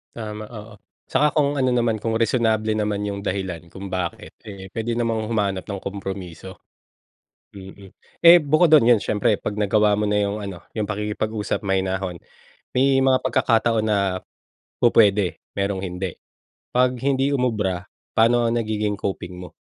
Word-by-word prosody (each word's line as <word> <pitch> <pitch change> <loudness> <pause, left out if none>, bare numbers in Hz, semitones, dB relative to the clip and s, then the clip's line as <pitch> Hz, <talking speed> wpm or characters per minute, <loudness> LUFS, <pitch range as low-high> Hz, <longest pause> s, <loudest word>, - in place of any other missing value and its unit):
Tama, 110 -2 -6
oo. 110 -1 -10 0.3
Saka 150 0 +2
kung 145 -1 +2
ano 130 -1 +2
naman, 120 -2 +1
kung 110 +1 -2
reasonable 110 -2 +1
naman 105 -1 -1
'yong 100 -1 -3
dahilan, 95 -3 -4
kung 95 +1 -8
bakit, 90 -2 -4
eh, 100 -2 -9
puwede 115 0 -3
namang 115 -2 -1
humanap 100 -5 -1
ng 100 -2 -4
kompromiso. 95 -2 -7 1.0
Mm, 95 0 -12 0.3
eh, 170 +1 +10
bukod 155 +3 +3
do'n, 135 -6 +6
'yon 120 -3 +6
siyempre, 105 0 +1
pag 105 - -4
nagawa 105 0 +2
mo 105 0 0
na 105 - +2
'yong 100 +1 -2
ano, 95 -3 -6 0.2
'yong 105 -2 -2
pakikipag-usap, 105 +1 -2
mahinahon, 95 -2 -1 0.6
may 135 0 +4
mga 130 -1 +4
pagkakataon 115 -1 +2
na 105 -2 +2 0.9
pupuwede, 100 -7 +4 0.2
merong 100 -1 -2
hindi. 90 0 -5 0.6
'Pag 125 0 +2
hindi 135 0 +1
umubra, 105 -9 -1 0.3
paano 120 +1 +4
ang 120 - 0
nagiging 105 -2 -1
coping 90 -2 -5
mo? 90 0 -9
105 Hz, 150 wpm, -22 LUFS, 95-115 Hz, 1.0 s, eh